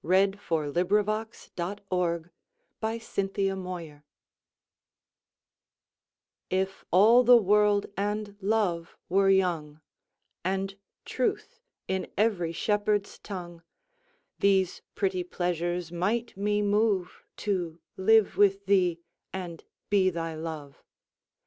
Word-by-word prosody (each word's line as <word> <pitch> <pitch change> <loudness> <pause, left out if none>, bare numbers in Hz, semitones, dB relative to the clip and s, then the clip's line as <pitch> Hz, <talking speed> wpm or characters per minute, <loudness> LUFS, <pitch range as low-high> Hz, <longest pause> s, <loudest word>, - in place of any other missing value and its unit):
Her - - -11 0.4
Reply 160 -2 +1
(Written 185 +6 +2 1.8
by 220 +1 -1
Sir 225 -3 -2
Walter 195 -1 0
Raleigh) 175 -5 -7 2.5
IF 190 +1 -1
all 220 +7 +6
the 245 0 +8
world 210 -1 +3
and 205 0 -2
love 190 -5 0
were 195 +2 +4
young, 170 -6 +1 0.6
And 195 +2 -1 0.3
truth 460 +2 -2 0.3
in 190 0 -2
every 195 -6 +1
shepherd's 205 +3 0
tongue, 175 -4 -8 0.8
These 190 -2 +2
pretty 185 -3 0
pleasures 175 -1 -2
might 215 +7 -1
me 205 +1 0
moveTo 200 -4 -1 0.2
live 220 +2 +4
with 200 -1 +3
thee 180 -3 +2 0.3
and 175 -3 -6 0.3
be 195 -2 +4
thy 165 -2 -4
Love. 155 -3 -7
190 Hz, 95 wpm, -28 LUFS, 175-205 Hz, 2.5 s, the